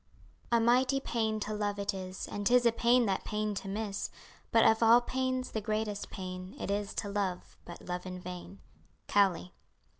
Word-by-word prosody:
"A 235 - +5
mighty 255 +4 +3
pain 220 -4 -1
to 215 - -3
love 205 -1 -1
it 200 0 -1
is 185 -1 -6
And 205 -1 -2
'tis 245 0 +5
a 235 - +6
pain 240 +1 +3
that 195 -2 0
pain 210 0 -2
to 195 - -5
miss; 205 0 -3 0.4
But 225 - +5
of 220 +1 +5
all 230 +1 +7
pains, 255 +1 -2
the 220 - -2
greatest 215 -1 -2
pain 185 -1 -7
It - - -3
is 205 0 -2
to 205 - -2
love, 200 -3 -3
but 175 - -10
love 180 +1 -4
in 185 0 -6
vain." 180 +2 -8 0.5
COWLEY. 190 -3 +2
205 Hz, 185 wpm, -31 LUFS, 195-230 Hz, 0.5 s, all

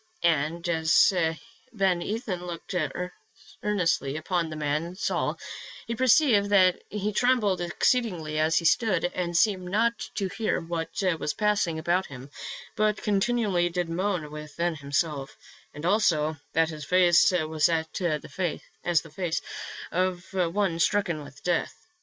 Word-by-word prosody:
" - - -38
" - - -21 0.2
And 165 +4 -4
as 165 +2 +4 0.6
Ben 190 -6 +1
Ethan 205 -3 -3
looked 175 +2 -7 0.9
earnestly 165 -8 0
upon 170 0 -1
the 155 - -6
man 155 +3 -2
Saul, 195 - -1 0.5
he 235 - -3
perceived 250 -4 +4
that 185 -3 +4
he 210 0 -2
trembled 215 -6 +2
exceedingly 175 -4 0
as 160 +1 +3
he 170 - 0
stood, 180 -3 +2
and 175 -2 -1
seemed 185 -3 +2
not 230 +4 +1 0.2
to 195 - -1
hear 220 +3 -1
what 165 -1 -4 0.3
was 150 - -2
passing 210 -6 +1
about 175 +4 0
him, 135 +1 -10 0.4
but 215 -1 +1
continually 205 -4 +1
did 175 -1 -2
moan 175 -3 -1
within 150 +3 -3
himself, 145 -1 -2 0.3
and 150 +2 -8
also 160 -6 +2 0.2
that 165 0 +3
his 155 -2 -7
face 175 +2 +5
was 155 -3 +1
as 165 -1 +1 1.2
the 165 - -14
face 170 -2 -2 0.5
of 180 0 0
one 180 -1 0
stricken 175 -4 +1
with 140 0 -14
death. 175 -2 0
175 Hz, 140 wpm, -27 LUFS, 160-200 Hz, 1.2 s, face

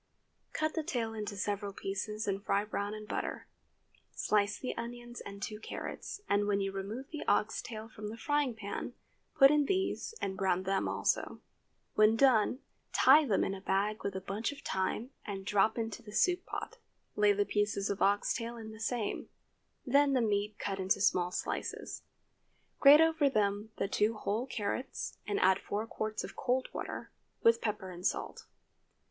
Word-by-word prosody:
Cut 310 0 -1
the 320 - 0
tail 240 -8 -2
into 210 -2 -4
several 200 +1 -2
pieces 210 +3 -3
and 200 0 -1
fry 200 0 +1
brown 205 0 -3
in 215 0 -8
butter. - - -3 0.7
Slice 205 -1 +1
the 255 - -4
onions 240 +1 -6
and 200 0 -8
two 210 +1 -4
carrots, 400 - -6
and 205 0 +2
when 200 -1 +2
you 195 0 -1
remove 205 +8 -5
the 305 - -4
ox 210 +1 +2
tail 220 -1 -7
from 215 -2 -8
the 220 +2 -6
frying 290 0 +1
pan, 205 -2 -5 0.4
put 275 -2 +8
in 300 -1 +4
these 385 +5 -1
and 190 -1 -2
brown 190 -1 +1
them 195 +1 0
also. - - 0 0.5
When 215 +1 +5
done, 250 0 +4 0.3
tie 310 0 +7
them 205 - +2
in 195 - -1
a 195 - -7
bag 200 +3 0
with 200 -1 -2
a 190 - -3
bunch 200 +6 -2
of 285 - -10
thyme 205 +6 -2
and 195 -2 -5
drop 205 +3 +3
into 225 -2 -3
the 210 -2 -11
soup 360 - +2
pot. - - -5 0.4
Lay 210 0 +5
the 205 0 +2
pieces 205 0 0
of 200 - -4
ox 205 +1 +3
tail 235 +1 -4
in 220 -1 -8
the 220 - -11
same; 225 -1 -2 0.6
then 280 0 +4
the 260 - +3
meat 210 -1 0
cut 195 -3 -3
into 190 +1 +2
small 180 -2 +3
slices. - - -4 0.8
Grate 290 +2 +9
over 320 -3 +4
them 205 -2 0
the - - 0
two 210 +2 +1
whole 215 +4 -2
carrots, 250 +3 -3
and 205 - 0
add 190 +1 +5
four 210 +2 -3
quarts 215 -1 -3
of - - -8
cold 255 0 0
water, - - -5 0.3
with 230 0 +5
pepper 210 -4 -2
and 175 0 -9
salt. - - -4
215 Hz, 180 wpm, -32 LUFS, 200-240 Hz, 0.8 s, Grate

